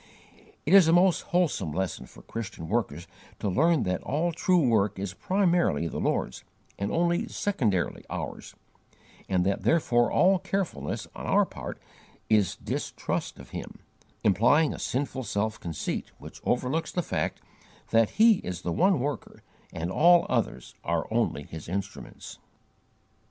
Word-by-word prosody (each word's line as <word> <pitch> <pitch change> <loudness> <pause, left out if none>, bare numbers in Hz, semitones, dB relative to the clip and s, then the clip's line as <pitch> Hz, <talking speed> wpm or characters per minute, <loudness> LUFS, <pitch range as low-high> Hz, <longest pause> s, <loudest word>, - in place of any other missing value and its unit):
It 160 - +2
is 195 -4 +8
a 165 - +4
most 180 0 +4
wholesome 175 - +1
lesson 90 -7 -3
for - - -16
Christian 105 -8 -6
workers 95 -7 -1 0.3
to - - -3
learn 160 - +3
that 90 -1 -1
all 160 +5 -1
true 170 -2 +2
work 105 -3 +2
is 95 -1 -4
primarily 175 - +1
the - - -4
Lord's, - - -1 0.4
and 100 +1 -2
only 170 +1 +1
secondarily 110 - -1
ours, - - -6 0.7
and 90 -2 +2
that 100 0 0
therefore 120 -7 +2
all 185 +1 +4
'carefulness' 185 - -3
on - - -7
our - - +4
part - - -8 0.5
is 105 -4 +3
distrust - - -4
of - - -13
Him, - - -7 0.5
implying 130 - +4
a - - -8
sinful 130 0 -2
self 110 0 -2
conceit 80 -3 -4
which - - -12
overlooks 130 +6 0
the 180 - -1
fact - - -2 0.5
that 115 -1 +3
He 220 -1 +7
is 90 -2 -6
the 85 - -1
one 190 - +3
Worker 140 +3 -4 0.3
and 85 +2 -4
all 170 - +5
others 65 - -2
are 85 0 0
only 115 -10 0
His 80 +2 -9
instruments. 100 +2 -6
120 Hz, 145 wpm, -27 LUFS, -, 0.7 s, is